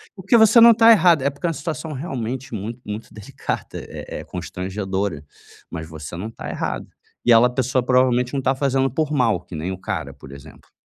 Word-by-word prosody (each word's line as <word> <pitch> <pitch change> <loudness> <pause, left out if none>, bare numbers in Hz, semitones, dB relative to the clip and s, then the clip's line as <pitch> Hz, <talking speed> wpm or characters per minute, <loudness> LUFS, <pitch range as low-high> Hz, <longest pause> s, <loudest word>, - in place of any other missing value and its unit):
Prque 200 +4 +2
você 220 +1 +6
não 235 0 +10
está 230 0 +6
errada. 175 -9 +5
É - - +4
porque 140 +5 -8
é - - +1
uma - - -2
situação 155 +1 -5
realmente 130 -4 -5
muito 110 +3 -5
muito 105 +2 -7
delicada. 105 -2 -5 0.2
É - - -8
é - - -7
constrangedora. 95 -1 -4 0.5
Mas 80 -2 -6
você 80 0 -8
não 100 +5 -5
tá - - -8
errada. - - -4 0.4
E 120 - +4
ela 115 +1 +7
a - - -4
pessoa, 130 +1 0
provavelmente, 125 0 +2
não 140 - 0
está 135 0 +1
fazendo 135 0 +1
por 150 +4 -2
mal, 115 - +1
que 90 -1 -11
nem 80 +4 -3
o 95 - -5
cara, 70 -7 -4
por 70 -1 -14
exemplo. 70 0 -14
125 Hz, 210 wpm, -21 LUFS, 95-140 Hz, 0.5 s, não